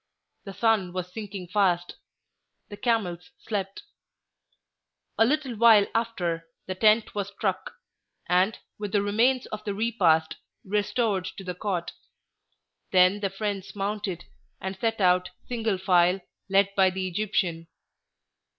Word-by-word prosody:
The 195 - -7
sun 210 -5 +1
was 180 0 -5
sinking 195 -4 -7
fast. 180 -3 +1 0.7
The 205 - -7
camels 205 -4 -1
slept. 200 - -4 1.4
A 225 - +7
little 275 -1 0
while 220 -2 +6
after, 175 -8 -1 0.2
the 190 - -3
tent 215 +3 +3
was 200 -2 -2
struck, 195 -2 -3 0.5
and, 185 +4 +2 0.2
with 205 -2 -5
the 205 -1 +3
remains 240 +5 +2
of 215 0 -5
the 205 -2 -3
repast, 180 -8 +2 0.3
restored 205 -1 0
to 195 - -7
the 180 -1 -4
cot; 180 -2 -3 1.0
then 185 +2 +4
the 200 -1 -1
friends 200 0 -4
mounted, 200 -3 -3 0.3
and 190 +1 -4
set 225 +3 -1
out 180 -1 +3 0.2
single 225 -5 -1
file, 180 0 +3 0.3
led 195 0 +3
by 190 -1 +4
the 185 0 -3
Egyptian. 180 -3 -1
195 Hz, 130 wpm, -26 LUFS, 185-215 Hz, 1.4 s, A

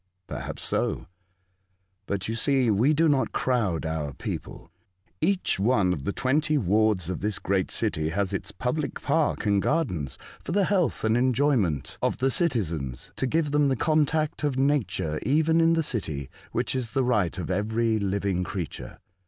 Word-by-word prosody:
'' 95 - -51
Perhaps - - -6
so; - - -1 1.0
but 100 -2 -2
you 110 - -2
see 125 0 +2
we 115 +8 +3
do 160 +2 +3
not 140 -3 +2
crowd 105 -11 0
our 80 -3 -3
people. - - -6 0.5
Each 185 - +1
one 100 -4 +3
of 70 -6 -6
the - - 0
twenty 150 +6 +1
wards 105 - +2
of 90 - -5
this 105 +1 -1
great 95 -1 0
city 75 0 -1
has 100 +3 -1
its 95 - -3
public 140 +4 -2
park 150 -2 +1
and 100 -1 +3
gardens 90 - -1 0.2
for - - -5
the 200 0 +3
health 185 -5 +1
and 110 0 +2
enjoyment 120 - +1
of - - 0
the 135 +1 +1
citizens, 85 - -1
to 130 - -1
give 155 +1 0
them 145 0 +3
the 135 - +2
contact 155 +2 +1
of 145 -3 0
Nature 110 - 0
even 160 +4 +3
in 165 0 +4
the 165 -1 +2
city, 80 - -3 0.2
which - - 0
is 120 -5 -3
the 135 - +2
right 105 -9 +1
of 90 0 -4
every 110 +3 +1
living 100 -2 -1
creature. - - -5
115 Hz, 170 wpm, -26 LUFS, 95-145 Hz, 1.0 s, in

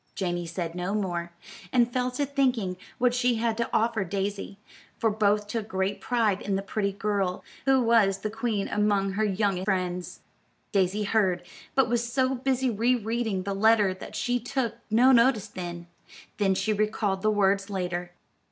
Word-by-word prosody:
Janey 175 -2 -2
said 165 0 -4
no 180 +3 -2
more, 175 -4 -2 0.4
and 240 -1 +3
fell 250 0 +1
to 255 +3 -1
thinking 255 -9 0 0.2
what 250 -1 +2
she 245 -1 +2
had 225 0 0
to 235 - -1
offer 225 -2 +1
Daisy; 195 +1 -3 0.4
for 225 - +1
both 210 0 +2
took 215 0 -4
great 190 -1 -2
pride 220 -5 +1
in 200 - -1
the 195 - -2
pretty 200 0 -1
girl, 200 -2 -1 0.2
who 270 -1 +4
was 225 -4 +4
the 210 +2 -4
queen 225 -3 -1
among 205 -2 +1
her 210 +3 0
young 200 -2 0
friends. 180 -2 -2 0.5
Daisy 195 +1 +1
heard, 195 -4 +1 0.3
but 265 -2 +4
was 235 0 -1
so 260 +1 +2
busy 265 0 0
re 230 +4 +2
reading 220 -4 -2
the 200 +1 -2
letter 210 -1 +4
that 185 - -10
she 245 0 0
took 245 -1 -2
no 240 +4 +5
notice 235 -4 +4
then, 175 -3 -7 0.5
though 195 -2 +3
she 205 +3 0
recalled 210 -2 0
the 215 - +2
words 200 -1 +2
later. 180 -2 -3
210 Hz, 170 wpm, -27 LUFS, 190-235 Hz, 0.5 s, no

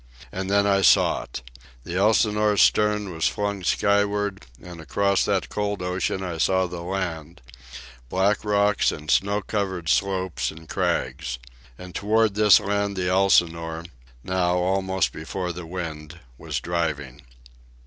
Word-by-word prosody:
And 95 0 -4
then 100 0 +3
I 100 -1 +3
saw 95 - +4
it! - - -8 0.4
The 85 - -6
Elsinore's 105 +1 +3
stern 105 -2 +2
was 80 -1 0
flung 100 -2 -2
skyward, 100 0 0
and 85 -1 -10
across 100 +4 +1
that 100 -2 0
cold 105 -2 -2
ocean 90 +1 -2
I 85 -3 -5
saw 95 +2 +2
land—black 85 -2 -4
rocks 105 -1 +2
and 75 +1 -5
snow 100 +1 +1
covered 95 -6 -3
slopes 95 -1 0
and 80 0 -12
crags. 65 -3 -2 0.4
And 90 -1 -10
toward 110 0 +2
this 105 -1 +6
land 100 0 -1
the 90 -1 0
Elsinore, 85 -3 +2 0.4
now 90 -1 0
almost 95 +1 0
before 90 +3 -4
the 85 -1 -8
wind, 85 -2 -6 0.2
was - - -4
driving. 75 -6 -3
95 Hz, 130 wpm, -24 LUFS, 85-100 Hz, 0.4 s, this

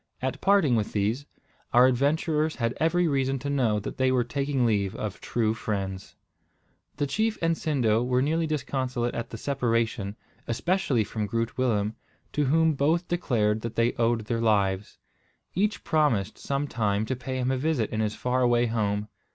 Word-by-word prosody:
At 130 0 -3
parting 190 -10 +4
with 110 -2 -1
these, 110 +8 -1 0.5
our 125 +1 +7
adventurers 150 +4 +1
had 115 -1 -1
every 170 +2 +2
reason 135 -2 +1
to 140 +2 -4
know 120 -7 +2
that - - -6
they 130 0 +2
were 125 -1 +3
taking 135 +1 -1
leave 100 -4 +1
of 105 -2 -5
true 110 -2 0
friends. 100 -4 -4 0.8
The 145 - +1
chief 215 +10 0
and 165 0 +1
Sindo 120 -9 +1
were 125 +1 +1
nearly 160 +3 +1
disconsolate 130 -5 -2
at 115 - -4
the 115 - -7
separation, 115 -5 -1 0.3
especially 135 - +1
from 105 0 -3
Groot 115 +2 -2
Willem, 110 -5 +1 0.4
to 150 - +1
whom 160 +3 +3
both 160 +5 +1
declared 110 -11 +1
that 115 0 -5
they 115 +1 +2
owed 115 0 +1
their 115 0 -1
lives. 100 -3 +1 0.6
Each 205 +4 0
promised 130 - +1
sometime 115 -7 -1
to 130 - -2
pay 130 +1 -5
him 130 0 0
a 130 - 0
visit 135 -5 0
in 110 - -2
his 105 -1 0
far 125 +1 0
away 120 -1 +3
home. 105 -2 -1
125 Hz, 170 wpm, -27 LUFS, 110-145 Hz, 0.8 s, our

